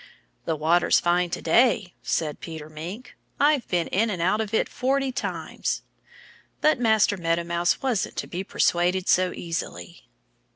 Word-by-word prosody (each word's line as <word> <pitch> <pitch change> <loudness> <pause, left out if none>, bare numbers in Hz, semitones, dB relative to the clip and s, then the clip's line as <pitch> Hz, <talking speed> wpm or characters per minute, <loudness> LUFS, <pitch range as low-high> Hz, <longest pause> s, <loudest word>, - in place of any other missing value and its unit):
"The 165 - 0
water's 165 +3 +3
fine 175 +1 +1
to - - -5
day," 205 0 +3
said 155 -2 -2
Peter 160 -2 -8
Mink. 175 +11 -8 0.2
"I've 290 -2 +3
been 175 -2 0
in 220 +4 +1
and 190 -4 -3
out 185 +6 +2
of 215 -2 -4
it 225 - +1
forty 270 +1 0
times." - - -3 0.8
But 305 -4 +3
Master 220 -3 +3
Meadow 170 -1 0
Mouse 170 +4 0
wasn't 245 -7 -1
to - - -3
be 180 +2 -5
persuaded 180 0 +1
so 185 0 +3
easily. 90 - -6
180 Hz, 155 wpm, -25 LUFS, 170-220 Hz, 0.8 s, water's